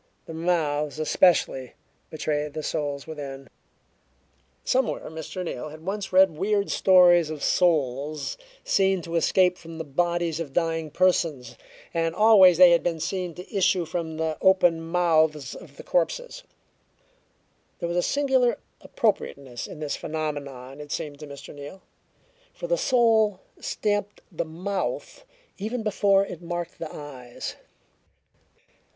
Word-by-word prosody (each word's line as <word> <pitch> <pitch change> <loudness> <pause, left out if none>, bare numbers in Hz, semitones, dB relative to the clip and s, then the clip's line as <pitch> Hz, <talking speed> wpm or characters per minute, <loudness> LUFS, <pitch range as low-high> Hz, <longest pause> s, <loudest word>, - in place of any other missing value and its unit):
The 165 - -8
mouths, 155 -3 0
especially, 155 -5 +2 0.4
betrayed 150 -1 -2
the 155 0 -5
souls 145 -2 -3
within. 140 -4 -7 1.2
Somewhere 255 -9 0
Mr. 160 +3 -6
Neal 155 -1 -5
had 155 +2 -12
once 200 +1 -3
read 190 0 +6
weird 200 +4 0
stories 175 -3 +5
of 155 -2 -6
souls 150 -3 +1 0.3
seen 190 -2 +2
to 165 +1 -5
escape 180 +2 +3
from 165 -1 -10
the 160 - -4
bodies 170 +2 -1
of 150 -5 -5
dying 165 -1 0
persons, 160 -7 +1 0.4
and 165 -1 0
always 195 -4 +7
they 180 -1 +8
had 170 - +4
been 165 -2 -2
seen 175 +1 -3
to 180 +4 -10
issue 185 -2 +2
from 160 -1 -4
the 160 -1 -2
open 175 -3 +4
mouths 160 -3 +1
of - - -13
the - - -9
corpses. - - -1 1.4
There 170 - -3
was 170 +1 -2
a - - +3
singular 265 0 +2 0.2
appropriateness 140 - -2
in 155 - -10
this 150 -2 -2
phenomenon, 145 -3 -5
it 145 -1 -10
seemed 150 -3 -4
to 150 - -9
Mr. 140 -1 -10
Neal, 145 +6 -10 0.7
for - - -6
the - - +1
soul 230 - +3 0.2
stamped 205 -1 -2
the 170 -1 -3
mouth 200 - -4 0.3
even 220 +4 -3
before 200 -2 +3
it - - -8
marked 175 0 -5
the 165 - -6
eyes. 130 -5 -8
170 Hz, 135 wpm, -25 LUFS, 150-190 Hz, 1.4 s, they